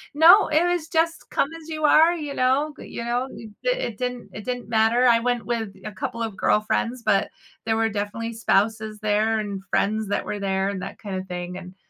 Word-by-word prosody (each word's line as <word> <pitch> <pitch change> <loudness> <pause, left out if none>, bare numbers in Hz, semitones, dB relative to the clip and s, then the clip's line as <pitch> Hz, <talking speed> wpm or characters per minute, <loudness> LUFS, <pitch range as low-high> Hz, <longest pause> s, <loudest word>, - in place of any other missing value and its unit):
No, 340 +7 +8
it 310 +2 +3
was 350 -2 0
just 330 0 0
"come 280 - +1
as 320 - -13
you 310 -1 -2
are," 320 +3 +6
you 295 -4 -5
know? 270 +4 +1
G - - -9
you - - -6
know, 245 +2 -1
th 225 -4 -10
it - - -1
didn't 250 0 -4
it 210 - -7
didn't 245 +1 -4
matter, 225 +2 +3
I 235 -2 +6
went 245 0 -1
with 225 -4 -3
a 215 - -4
couple 230 +2 -5
of 220 -3 -4
girlfriends, 230 +5 0
but 195 -3 +2 0.4
there 225 -1 +1
were 225 0 +1
definitely 215 +2 -4
spouses 220 0 0
there, 215 +1 +1
and 200 -2 -4
friends 215 +1 0
that 205 - -1
were 205 - -4
there, 195 0 0
and 195 -2 -4
that - - -7
kinda 190 -3 -4
thing, 180 0 -5
and, 180 0 -10
225 Hz, 210 wpm, -24 LUFS, 205-260 Hz, 0.4 s, No